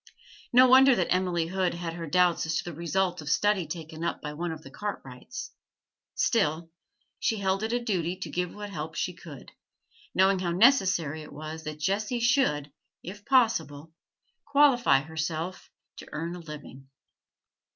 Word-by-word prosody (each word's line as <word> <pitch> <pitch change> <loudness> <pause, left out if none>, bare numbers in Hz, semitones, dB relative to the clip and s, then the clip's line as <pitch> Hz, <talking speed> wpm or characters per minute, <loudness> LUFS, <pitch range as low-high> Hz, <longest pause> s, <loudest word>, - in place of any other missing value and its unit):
No 255 +1 +7
wonder 260 +1 +7
that 180 -5 -1
Emily 180 -2 0
Hood 185 0 -1
had 170 -1 -4
her 165 -1 -6
doubts 175 0 +2
as 160 0 0
to - - -2
the 175 - -7
result 175 +2 -1
of 145 - -6
study 205 -1 +2
taken 160 0 -7
up 170 - -2
by 150 0 -6
one 170 +2 -3
of 160 -1 -8
the 135 - -12
Cartwrights. 165 - -7 0.6
Still, 165 -7 +1 0.5
she 225 - 0
held 195 0 0
it 220 +1 -2
a 240 - +2
duty 185 -7 -1
to 185 - -7
give 180 -1 -2
what 205 -1 -8
help 155 -2 -6
she 180 - -2
could, 165 -5 -12 0.6
knowing 190 0 +4
how 180 -1 -1
necessary 185 - +3
it 150 - -11
was 155 +2 -8
that 155 0 -5
Jessie 205 +8 -1
should, 230 - +2 0.3
if 205 +3 -9
possible, 165 - +1 0.5
qualify 260 - +4
herself 160 +3 -4 0.3
to - - -10
earn 165 +3 -4
a - - -8
living. 150 -4 -11
175 Hz, 165 wpm, -27 LUFS, 155-200 Hz, 0.6 s, No